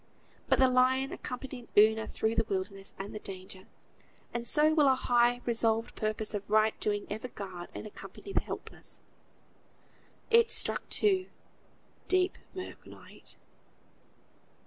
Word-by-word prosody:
But -, -, +5 dB
the 260 Hz, -, +6 dB
lion 260 Hz, +2 st, +3 dB
accompanied 250 Hz, -6 st, -6 dB
Una 220 Hz, +1 st, +5 dB
through 220 Hz, 0 st, -1 dB
the 225 Hz, -, +2 dB
wilderness 195 Hz, 0 st, -4 dB
and 195 Hz, +1 st, -6 dB
the 215 Hz, -, -5 dB
danger; 190 Hz, 0 st, -8 dB, 0.7 s
and 235 Hz, 0 st, -3 dB
so 305 Hz, +1 st, +4 dB
will 300 Hz, -3 st, +5 dB
a 265 Hz, -, +5 dB
high, 245 Hz, -1 st, +3 dB
resolved 230 Hz, -1 st, +1 dB
purpose 215 Hz, 0 st, -1 dB
of 205 Hz, -1 st, -4 dB
right 215 Hz, +1 st, +4 dB
doing 205 Hz, -1 st, -1 dB
ever 220 Hz, +4 st, -4 dB
guard 190 Hz, -6 st, -8 dB
and -, -, -6 dB
accompany 390 Hz, -, -10 dB
the -, -, +2 dB
helpless. -, -, -7 dB, 1.3 s
It 460 Hz, 0 st, +6 dB
struck -, -, +1 dB
two; 380 Hz, -3 st, +2 dB, 0.8 s
deep, 370 Hz, 0 st, +2 dB, 0.2 s
mirk, 370 Hz, -, -8 dB
night. -, -, -12 dB
230 Hz, 135 wpm, -31 LUFS, 210-265 Hz, 1.3 s, the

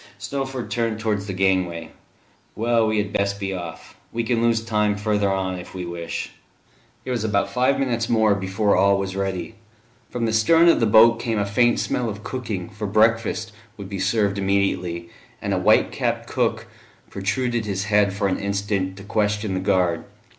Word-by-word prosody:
Snowford 135 Hz, +3 st, -4 dB
turned 115 Hz, -2 st, -1 dB
towards 105 Hz, -2 st, -1 dB
the 95 Hz, -, -3 dB
gangway. 90 Hz, -3 st, 0 dB, 0.6 s
"Well, 115 Hz, 0 st, +2 dB
we 110 Hz, 0 st, 0 dB
had 105 Hz, 0 st, -1 dB
best 100 Hz, 0 st, 0 dB
be 95 Hz, -1 st, -3 dB
off: 85 Hz, -3 st, -8 dB, 0.2 s
we 115 Hz, 0 st, -2 dB
can 115 Hz, 0 st, 0 dB
lose 115 Hz, -1 st, +2 dB
time 105 Hz, -2 st, +1 dB
further 105 Hz, -1 st, +1 dB
on, 95 Hz, -1 st, -2 dB
if 90 Hz, -, -11 dB
we 90 Hz, -1 st, -4 dB
wish." 85 Hz, -1 st, -5 dB, 0.7 s
It 130 Hz, -, -3 dB
was 120 Hz, -3 st, -1 dB
about 105 Hz, -2 st, 0 dB
five 130 Hz, +2 st, +2 dB
minutes 120 Hz, -4 st, -1 dB
more 110 Hz, -2 st, +4 dB
before 100 Hz, +1 st, 0 dB
all 100 Hz, +1 st, +4 dB
was 95 Hz, -1 st, -3 dB
ready. 95 Hz, +2 st, -3 dB, 0.6 s
From 120 Hz, -1 st, -2 dB
the 110 Hz, -, -1 dB
stern 165 Hz, +10 st, +5 dB
of -, -, +4 dB
the 115 Hz, -, +2 dB
boat 115 Hz, +2 st, +6 dB
came 115 Hz, -2 st, -1 dB
a 100 Hz, -, +1 dB
faint 120 Hz, +4 st, +2 dB
smell 120 Hz, -2 st, -1 dB
of 105 Hz, 0 st, -7 dB
cooking, 115 Hz, -7 st, -4 dB
for 105 Hz, 0 st, -5 dB
breakfast 110 Hz, +1 st, +1 dB, 0.3 s
would 100 Hz, -2 st, -8 dB
be 100 Hz, -2 st, -5 dB
served 100 Hz, +1 st, +1 dB
immediately, 95 Hz, -3 st, -1 dB, 0.3 s
and -, -, -2 dB
a -, -, +1 dB
white -, -, +4 dB
capped -, -, -2 dB
cook -, -, -1 dB, 0.5 s
protruded 115 Hz, +4 st, -1 dB
his 100 Hz, -2 st, -2 dB
head 105 Hz, -1 st, +3 dB
for 100 Hz, +1 st, -1 dB
an 95 Hz, -, -1 dB
instant, 100 Hz, -1 st, -2 dB
to 100 Hz, -, -10 dB
question 105 Hz, 0 st, -1 dB
the 95 Hz, -, -1 dB
guard. 90 Hz, -4 st, +1 dB
105 Hz, 185 wpm, -23 LUFS, 95-115 Hz, 0.7 s, boat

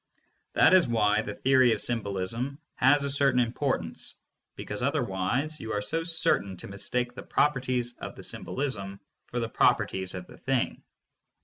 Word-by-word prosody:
That -, -, +5 dB
is 185 Hz, -2 st, +6 dB
why 105 Hz, -2 st, +2 dB
the 105 Hz, -2 st, -6 dB
theory 130 Hz, -2 st, +4 dB
of 110 Hz, -, -2 dB
symbolism 115 Hz, +4 st, -2 dB, 0.2 s
has 140 Hz, +2 st, +4 dB
a 140 Hz, -, -1 dB
certain 140 Hz, -2 st, +3 dB
im 120 Hz, -1 st, +1 dB
portance, 130 Hz, -, -2 dB, 0.4 s
because -, -, -5 dB
otherwise 125 Hz, +12 st, 0 dB
you 110 Hz, -, -5 dB
are 105 Hz, -, 0 dB
so 165 Hz, +11 st, -1 dB
certain 160 Hz, -, +1 dB
to -, -, -7 dB
mistake 120 Hz, +5 st, -2 dB
the -, -, -8 dB
properties 125 Hz, -4 st, 0 dB
of -, -, -7 dB
the -, -, -10 dB
symbolism 100 Hz, -8 st, -3 dB, 0.3 s
for 120 Hz, -, -3 dB
the 115 Hz, -, -1 dB
properties 95 Hz, -4 st, +1 dB
of 90 Hz, -1 st, -6 dB
the -, -, -15 dB
thing. 130 Hz, -3 st, -1 dB
120 Hz, 165 wpm, -28 LUFS, 105-135 Hz, 0.4 s, is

